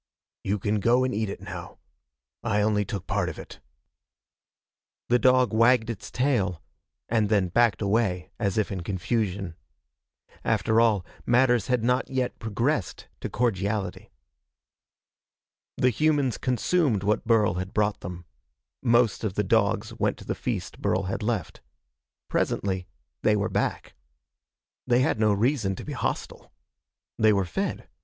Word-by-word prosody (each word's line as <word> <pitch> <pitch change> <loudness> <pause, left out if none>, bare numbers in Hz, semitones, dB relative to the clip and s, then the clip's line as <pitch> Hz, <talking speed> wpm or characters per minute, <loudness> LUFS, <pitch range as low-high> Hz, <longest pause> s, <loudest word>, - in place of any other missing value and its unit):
"You 100 +2 0
can 105 +2 0
go 120 +5 +3
and 130 0 0
eat 110 -1 -1
it 100 - -6
now. 95 -4 -8 0.7
I 110 -3 0
took - - +2
only 105 -1 +1
part 95 -1 -2
of - - -8
it." - - -10 1.5
The 125 +1 +4
dog 125 -2 +4
wagged 115 +1 +4
its 110 - -8
tail 115 - 0 0.4
and 110 -3 +1
then 100 -4 +2
backed 115 +2 +2
away 100 -3 0
as 100 -2 0
if 110 - 0
in 95 -2 -3
confusion. 95 -1 -2 0.9
After 110 0 +2
all, 105 -5 +2 0.2
matters 120 -2 +3
had 125 -3 +1
not 125 +2 +1
yet 130 -2 -2
progressed 115 - -2
to - - -4
cordiality. 100 -4 -1 1.7
The 125 - +3
humans 145 -2 +1
consumed 130 - +1
what 105 +2 0
Burl 110 -2 +4
had 95 +1 -5
brought 105 -1 0
them. 90 0 -8 0.6
Most 120 -3 +3
of 100 -4 -2
the 105 - +1
dogs 110 +2 +1
went - - +1
to - - -12
the - - -1
feast - - -4
Burl - - +1
had - - -3
left. - - -2 0.7
Presently 95 -2 -1 0.3
they 105 - +3
were 105 +1 0
back. - - -2 0.9
They 125 0 +4
had 120 - +1
no 110 -1 +4
reason 110 -1 +1
to - - -8
be - - -5
hostile. - - -4 0.7
They 110 0 +5
were 100 -2 +2
fed. 90 - -3
110 Hz, 145 wpm, -26 LUFS, 100-120 Hz, 1.7 s, They